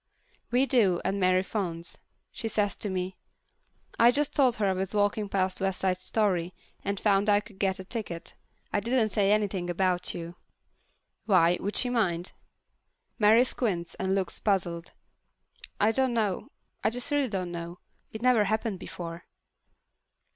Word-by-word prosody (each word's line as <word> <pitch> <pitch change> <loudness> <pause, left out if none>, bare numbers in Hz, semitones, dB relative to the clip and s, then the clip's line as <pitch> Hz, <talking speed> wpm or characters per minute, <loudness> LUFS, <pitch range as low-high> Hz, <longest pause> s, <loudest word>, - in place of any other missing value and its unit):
We 250 +2 +3
do, 210 -10 +3
and 195 +2 0
Mary 185 0 +3
phones. 175 -4 -2 0.3
She 235 - -4
says 205 -3 0
to 210 - -3
me, 185 0 -3 0.8
"I 235 - +8
just 285 +4 +1
told 255 -4 +4
her 215 - 0
I 190 - +2
was 190 +2 -2
walking 205 0 +1
past 190 -1 0
West 195 -1 0
Side 185 -1 +1
Story 185 -6 0 0.3
and 200 0 -2
found 200 0 +2
I 205 0 +5
could 205 -2 -14
get 190 -2 +1
a 190 - -6
ticket. 190 -5 -5 0.4
I 205 - +3
didn't 230 +1 +1
say 200 -1 +2
anything 200 -4 0
about 180 0 0
you." 170 0 -7 0.9
"Why, 180 -4 +5
would 205 - -3
she 250 - +2
mind?" 180 -7 0 0.9
Mary 220 +3 +6
squints 195 -9 -2
and 190 0 -1
looks 195 -1 -2
puzzled. 175 -4 -1 0.9
"I 210 +2 +4
don't 260 0 +1
know. 215 +2 -1 0.3
I - - +4
just 245 +4 -5
really 285 -3 +2
don't 185 -4 -3
know. 170 0 -6 0.3
It 220 +1 -7
never 245 -4 +4
happened 215 -1 -1
before." 170 -2 -7
195 Hz, 160 wpm, -28 LUFS, 185-220 Hz, 0.9 s, I